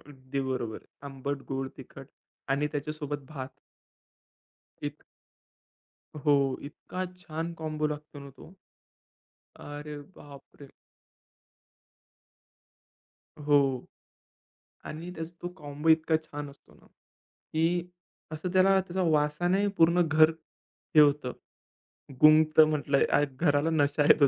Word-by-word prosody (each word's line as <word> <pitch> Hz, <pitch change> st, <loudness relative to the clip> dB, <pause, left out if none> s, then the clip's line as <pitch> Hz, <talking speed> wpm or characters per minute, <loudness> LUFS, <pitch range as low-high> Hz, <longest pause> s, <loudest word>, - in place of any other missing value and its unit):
अगदी 135 Hz, -1 st, -6 dB
बरोबर. 120 Hz, -4 st, -4 dB, 0.2 s
आंबट, 135 Hz, 0 st, -4 dB
गोड, 135 Hz, 0 st, -2 dB
तिखट 135 Hz, 0 st, -11 dB, 0.4 s
आणि 140 Hz, +2 st, +1 dB
त्याच्यासोबत 145 Hz, -1 st, -4 dB
भात. 135 Hz, -4 st, -6 dB, 1.3 s
इत 145 Hz, +1 st, -5 dB, 1.2 s
हो, 145 Hz, -, +5 dB, 0.3 s
इतका 185 Hz, +5 st, -6 dB, 0.2 s
छान 165 Hz, 0 st, -4 dB
कॉम्बो 155 Hz, -1 st, -1 dB
लागतो 150 Hz, 0 st, -6 dB
ना 140 Hz, 0 st, -10 dB
तो. 140 Hz, +7 st, -15 dB, 1.0 s
अरे, 150 Hz, 0 st, -8 dB, 0.2 s
बाप 140 Hz, -1 st, -13 dB, 0.2 s
रे! 140 Hz, -, -10 dB, 2.8 s
हो. 140 Hz, -3 st, +3 dB, 1.0 s
आणि 165 Hz, +3 st, -7 dB
त्याचा 160 Hz, 0 st, -6 dB
तो 175 Hz, -, -2 dB
कॉम्बो 150 Hz, 0 st, -4 dB
इतका 160 Hz, 0 st, +4 dB
छान 145 Hz, -2 st, -7 dB
असतो 140 Hz, -, -21 dB
ना, -, -, -22 dB
की 170 Hz, +2 st, -4 dB, 0.4 s
असं 155 Hz, +4 st, -4 dB
त्याला 190 Hz, +1 st, +5 dB
त्याच्या 185 Hz, 0 st, -3 dB
वासाने 160 Hz, +6 st, +2 dB
पूर्ण 170 Hz, +2 st, +5 dB
घर 155 Hz, 0 st, +6 dB, 0.6 s
हे 155 Hz, -, +8 dB
होतं, 145 Hz, -3 st, +3 dB, 0.9 s
गुंगतं 155 Hz, 0 st, +7 dB
म्हटलंय. 145 Hz, -2 st, +2 dB, 0.2 s
घराला 145 Hz, +2 st, +1 dB
नशा 145 Hz, -1 st, +2 dB
येतो 140 Hz, -3 st, +7 dB
150 Hz, 105 wpm, -29 LUFS, 140-160 Hz, 2.8 s, हे